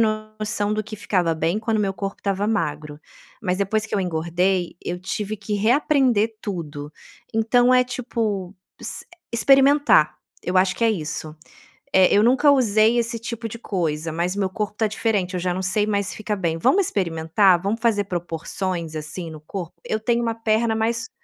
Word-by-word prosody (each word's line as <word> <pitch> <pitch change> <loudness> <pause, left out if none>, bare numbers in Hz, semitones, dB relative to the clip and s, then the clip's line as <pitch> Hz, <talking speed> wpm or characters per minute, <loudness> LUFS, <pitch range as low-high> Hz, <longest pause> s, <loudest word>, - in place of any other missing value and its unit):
noção 215 -1 -1
do 215 0 -1
que 215 +1 -8
ficava 180 -5 0
bem 165 +5 0
quando 220 0 -1
meu 195 -2 0
corpo 195 0 -5
estava 200 0 -1
magro. 150 -8 -2 0.4
Mas 185 -2 -1
depois 205 +2 0
que 220 - -5
eu 200 - +1
engordei, 175 +1 0
eu 175 0 -4
tive 205 +3 -4
que 210 +1 -6
reaprender 230 0 +2
tudo. 150 -7 -5 0.4
Então, 245 +3 +4
é 250 0 +5
tipo, 225 -6 -3 0.3
ex - - -5 0.3
experimentar, 270 - +4 0.3
eu 185 +1 -1
acho 185 0 +3
que 230 - -1
é 225 - +4
isso. 155 -4 -4 0.6
Eh: 190 0 +5
"Eu 210 - +5
nunca 260 +5 +4
usei 230 -4 +4
esse 235 0 -1
tipo 230 0 -5
de 235 - -8
coisa, 165 -7 -2
mas 175 +4 -1
meu 195 -2 0
corpo 210 +2 -4
tá 220 - +2
diferente, 205 -3 -1
eu 180 - -1
já 180 0 -1
não 185 - -3
sei 190 +3 +1
mais 200 -2 -1
fica 215 0 -4
bem. 170 -5 -1
Vamos 380 - +3
experimentar? 175 - +2
Vamos 210 +4 -2
fazer 210 -4 +2
proporções, 175 -1 -4
assim, 160 +3 -5
no 155 -1 -10
corpo?" 175 +1 -7
"Eu 215 - -2
tenho 235 +2 +1
uma 230 -1 0
perna 225 0 +1
mais", 225 +1 -1
205 Hz, 180 wpm, -22 LUFS, 180-225 Hz, 0.6 s, é